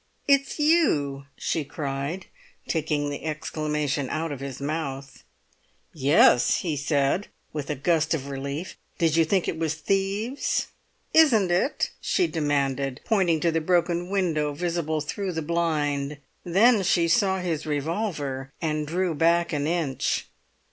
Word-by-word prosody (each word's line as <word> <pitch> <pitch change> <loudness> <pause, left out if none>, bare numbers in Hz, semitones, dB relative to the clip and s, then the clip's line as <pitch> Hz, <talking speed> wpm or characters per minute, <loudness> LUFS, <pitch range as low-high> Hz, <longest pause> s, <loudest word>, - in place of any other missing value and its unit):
"It's 275 -1 +3
you!" 155 - +2
she 160 - -1
cried, 140 +5 -4 0.4
taking 150 -3 -1
the 145 - -6
exclamation 150 -2 -2
out 160 0 -2
of 140 - -5
his 135 -2 -6
mouth. 140 -2 -4 0.7
"Yes," 140 -4 +4
he 165 -4 -2
said, 145 +5 0 0.3
with 150 -3 -4
a 150 - -1
gust 160 +3 +1
of 140 -3 -5
relief; 140 +5 -5 0.2
"did 165 -3 +2
you 165 - +5
think 185 +3 +1
it - - -2
was 160 -1 0
thieves?" 195 - -1 0.4
"Isn't 230 - +5
it?" 185 - +1
she 370 - +2
demanded, 140 - -1
pointing 180 -8 +2
to 170 - +2
the 165 0 0
broken 175 +1 +1
window 165 -7 0
visible 165 -1 -1
through 185 +5 -3
the 160 -1 -3
blind. 150 -3 -1 0.3
Then 205 +6 +4
she 170 -2 +2
saw 190 +2 +3
his 165 -4 -3
revolver, 145 -4 -2
and 155 -2 -1
drew 175 +2 0
back 170 +2 +2
an 145 0 0
inch. 160 -6 -1
160 Hz, 140 wpm, -25 LUFS, 145-180 Hz, 0.7 s, you